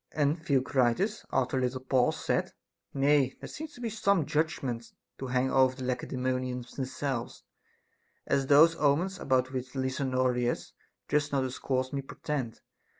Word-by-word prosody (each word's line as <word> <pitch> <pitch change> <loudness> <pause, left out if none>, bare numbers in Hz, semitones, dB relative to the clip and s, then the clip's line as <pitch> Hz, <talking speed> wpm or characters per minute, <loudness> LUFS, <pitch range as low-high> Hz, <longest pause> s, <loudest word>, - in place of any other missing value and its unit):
And 150 +2 +1
The 140 - +1
ocritus, 135 - +1
after 130 0 +1
a - - -1
little 125 +1 -1
pause, 130 -1 +1
said: - - 0 0.4
Nay, 140 -1 +3
there - - -7
seem 315 +2 -6
some 215 - 0
judgments 135 -7 -2 0.2
to 130 - -4
hang 125 +1 +1
over 130 -1 +4
the 130 - -7
Lacedaemonians 125 0 -2
themselves, 130 -2 -4 0.8
as 135 -1 +1
those 160 +4 +7
omens 170 +7 +1
about 130 -1 +1
which 130 -1 -5
Lysanoriclas 130 -2 0 0.4
just 145 0 +1
now 140 -1 +2
dis 130 -1 -4
coursed 130 0 -1
me 140 - -1
portend. 135 -4 -4
130 Hz, 145 wpm, -29 LUFS, 130-145 Hz, 0.8 s, those